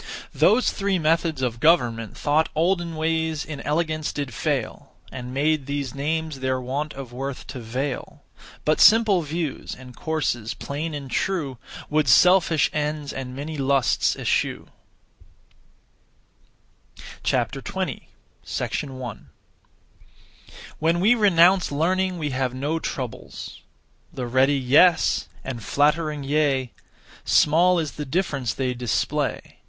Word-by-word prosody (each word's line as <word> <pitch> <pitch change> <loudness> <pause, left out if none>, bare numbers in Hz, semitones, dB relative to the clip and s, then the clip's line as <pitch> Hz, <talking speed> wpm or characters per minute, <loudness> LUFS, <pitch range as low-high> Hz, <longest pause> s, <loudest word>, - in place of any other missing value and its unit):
Those 245 +4 +4
three 195 -1 0
methods 160 -3 +1
(of 120 -2 -1
government) 120 - +2
Thought 155 +2 +1
olden 170 0 0
ways 160 -1 -1
in 150 -3 -7
elegance 155 +1 -1
did 140 -4 -4
fail - - -3 0.2
And 125 -1 -7
made 145 +1 0
these 140 -3 -3
names 155 +1 -2
their 130 0 -1
want 140 +4 -3
of 135 -3 -8
worth 135 +1 -5
to 130 - -6
veil; 125 +4 -4 0.4
But 155 0 +2
simple 215 -4 +6
views, 155 -1 -4
and 125 -1 -12
courses 145 -8 -2
plain 150 +3 -4
and 140 -3 -7
true 145 -6 -1 0.3
Would 150 -1 +2
selfish 175 +3 +5
ends 150 -1 -2
and 130 -1 -6
many 150 +3 -5
lusts 135 -3 +2
eschew. - - -1 2.5
20. - - -2 0.4
1. 130 -5 -5 1.5
When 165 +2 +2
we 210 +7 +5
renounce 190 -5 +4
learning 185 +5 0
we 150 -3 -3
have 130 -1 -1
no 145 +5 -1
troubles. 130 -6 -6 0.5
The 125 - -5
(ready) 130 +4 +3
'yes,' 145 +7 +4 0.2
and 120 -4 -6
(flattering) 150 +2 +1
'yea;' 135 -3 +1 0.5
Small 175 +4 +4
is 160 -3 -1
the 150 - -6
difference 140 - -1
they 130 -2 -1
display. 120 -3 -2
150 Hz, 120 wpm, -24 LUFS, 130-165 Hz, 2.5 s, simple